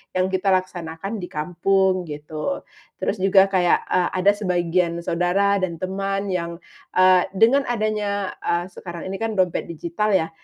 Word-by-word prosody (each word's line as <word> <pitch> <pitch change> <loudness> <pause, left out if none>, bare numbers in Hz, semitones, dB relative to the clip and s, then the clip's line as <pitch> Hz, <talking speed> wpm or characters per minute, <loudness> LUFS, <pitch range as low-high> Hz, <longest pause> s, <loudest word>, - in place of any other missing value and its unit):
yang 185 +1 +1
kita 190 +1 +2
laksanakan 185 +2 -4
di 180 - -5
kampung, 180 +5 0 0.2
gitu. 155 - -4 0.4
Terus 205 - -1
juga 195 +1 +5
kayak, 180 -3 +2
eee, 180 -1 +2
ada 200 - +6
sebagian 175 -3 0
saudara 180 +4 +1
dan 175 -4 -3
teman 195 +1 -2
yang, 170 -2 -3 0.3
eee, 185 -1 +5
dengan 235 +8 +4
adanya 210 -4 -2
ah 175 +1 0
sekarang 175 -1 -8
ini 195 - -4
kan 225 +1 -2
dompet 185 -4 0
digital 170 +6 -2
ya, 165 -4 +2
185 Hz, 150 wpm, -22 LUFS, 175-195 Hz, 0.4 s, ada